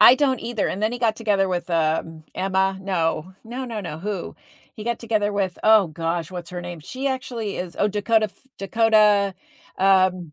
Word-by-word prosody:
I 235 +4 +10
don't 265 -3 +1
either, 230 -3 -1
and 200 - -4
then 220 - +1
he 245 - -4
got 225 -3 +1
together 205 -4 +1
with, 180 -1 -3
um, 160 -1 0
Emma. 190 0 0
No, 180 -2 -1
no, 245 +3 -5
no, 230 -3 -4
no. 165 -5 -6
Who? 195 0 -4 0.4
He 215 -5 -8
got 235 0 -1
together 215 -3 0
with, 195 -3 -1
oh 215 -3 +6
gosh, 165 +1 -3
what's 175 -2 -7
her 180 -1 -5
name? 175 -2 -7
She 255 - -5
actually 245 -6 -3
is 180 -2 -5
oh, 205 - +3
Dakota 215 +2 +2
F 215 +6 -20
Dakota, 210 -1 +3 0.4
um, 185 -4 +3
200 Hz, 190 wpm, -23 LUFS, 180-225 Hz, 0.4 s, I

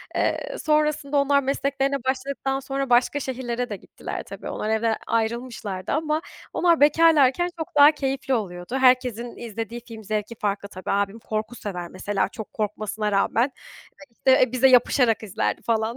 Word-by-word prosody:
Eee, - - -1
sonrasında 300 -2 +1
onlar 280 0 +3
mesleklerine 275 0 -1
başladıktan 270 +1 -2
sonra, 275 0 -3
başka 245 +4 +3
şehirlere 250 -2 -3
de 210 - -3
gittiler - - -7
tabii. - - -8
Onlar 215 - -3
evden 220 0 +1
ayrılmışlardı 225 -4 -2
ama 310 +1 0 0.3
onlar 340 -3 +3
bekarlarken 310 +1 +5
çok 320 - -6
daha 290 +1 +8
keyifli 270 -2 -2
oluyordu. 185 -1 -3
Herkesin 250 -2 +2
izlediği 230 +1 -6
film 225 -2 -9
zevki 215 +2 -3
farklı 200 -1 -2
tabii. 185 -2 -5
Abim 200 +2 0
korku 215 +1 -4
sever 180 -6 -5
mesela, 190 +1 -1
çok 220 0 -9
korkmasına 210 0 -2
rağmen. 225 +6 +2 0.5
Ya, - - -11 0.3
işte, 255 -2 +3
bize 255 +1 +4
yapışarak 245 -2 +4
izlerdi 205 -4 -2
falan. 225 0 0
240 Hz, 150 wpm, -24 LUFS, 215-275 Hz, 0.5 s, daha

